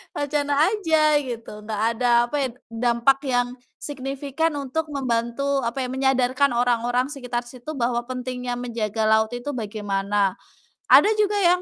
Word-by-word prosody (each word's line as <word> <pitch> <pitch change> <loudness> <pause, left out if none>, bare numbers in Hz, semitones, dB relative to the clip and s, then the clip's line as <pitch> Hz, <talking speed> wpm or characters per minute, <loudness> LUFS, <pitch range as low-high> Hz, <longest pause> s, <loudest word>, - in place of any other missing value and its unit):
wacana 290 0 -1 0.2
aja 330 -7 +1 0.2
gitu, 240 -5 -6
enggak 210 -1 -3
ada 245 +1 0 0.2
apa - - -4
ya, - - -8 0.2
dampak 240 +3 +2
yang 245 -1 +2 0.3
signifikan 280 +3 -3
untuk 285 +3 -3
membantu 275 0 -1
apa 260 +3 -2
ya, - - -2
menyadarkan 265 0 +2
orang-orang 245 +2 +1
sekitar 250 -4 -3
situ 250 +5 -9
bahwa 240 -1 -1
pentingnya 250 -1 -4
menjaga 230 -3 -3
laut 220 +1 +3
itu 245 +4 -4
bagaimana. 205 -4 -1 0.5
Ada - - +8
juga 415 -1 +2
yang 360 0 +4
250 Hz, 140 wpm, -23 LUFS, 235-280 Hz, 0.5 s, Ada